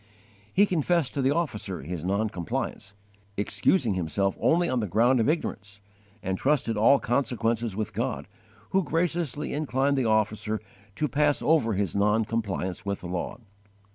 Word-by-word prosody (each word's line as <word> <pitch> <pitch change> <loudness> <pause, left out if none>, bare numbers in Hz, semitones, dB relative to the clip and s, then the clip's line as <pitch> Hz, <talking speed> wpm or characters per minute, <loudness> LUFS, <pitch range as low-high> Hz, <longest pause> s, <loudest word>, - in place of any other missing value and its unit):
He 200 - +5
confessed 170 -5 +1
to 140 - -1
the 130 - +3
officer 105 - -2
his 85 +1 -5
non 100 +4 +1
compliance, 100 +2 -4 0.4
excusing 115 - +2
himself 95 +2 0
only 170 +2 +3
on 130 -4 0
the 105 - -1
ground 120 +7 +3
of 115 - +2
ignorance, 105 -11 -3 0.4
and 95 0 -2
trusted 135 -5 +1
all 115 +7 +5
consequences 115 -4 0
with 105 0 -3
God, 120 +5 -2 0.4
who 190 0 +3
graciously 165 -3 -1
inclined 140 -1 +1
the 130 - +1
officer 110 0 +1 0.4
to 150 - 0
pass 145 0 +1
over 145 -8 +3
his 100 -2 -1
non 105 +2 +2
compliance 100 -5 -3
with 100 0 -3
the 90 - -6
law. 90 0 -3
115 Hz, 155 wpm, -27 LUFS, 100-145 Hz, 0.4 s, He